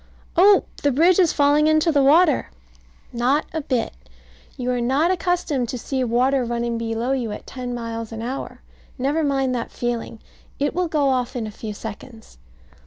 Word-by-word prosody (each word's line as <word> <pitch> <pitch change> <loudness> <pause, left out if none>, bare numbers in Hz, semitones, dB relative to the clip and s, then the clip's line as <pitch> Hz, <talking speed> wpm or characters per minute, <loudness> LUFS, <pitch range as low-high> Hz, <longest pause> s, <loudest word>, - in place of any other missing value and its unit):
Oh, 390 +3 +6 0.2
the 285 - +2
bridge 335 +8 +4
is 350 -4 +4
falling 290 +1 +3
into 310 +2 +3
the 285 -2 +3
water! 300 +2 +4 0.6
Not 255 +5 +1
a 320 - -2
bit. 255 -4 -1 0.6
You 250 0 -2
are 245 -1 -1
not 275 +8 +2
accustomed 345 -9 -1
to 250 - -3
see 260 +2 -2
water 250 +3 +2
running 235 0 -2
below 230 +2 -2
you 250 -5 -1
at - - -7
ten 250 -2 -6
miles 230 -1 -5
an 225 0 -6
hour. 260 +3 -6 0.3
Never 285 +5 0
mind 270 -3 +1
that 235 -2 -3
feeling. 240 -1 -4 0.4
It 285 +1 -1
will 360 0 0
go 295 -4 +1
off 255 0 -1
in 235 -3 -2
a 215 - -6
few 210 0 -7
seconds. 225 +2 -10
260 Hz, 175 wpm, -22 LUFS, 235-300 Hz, 0.6 s, Oh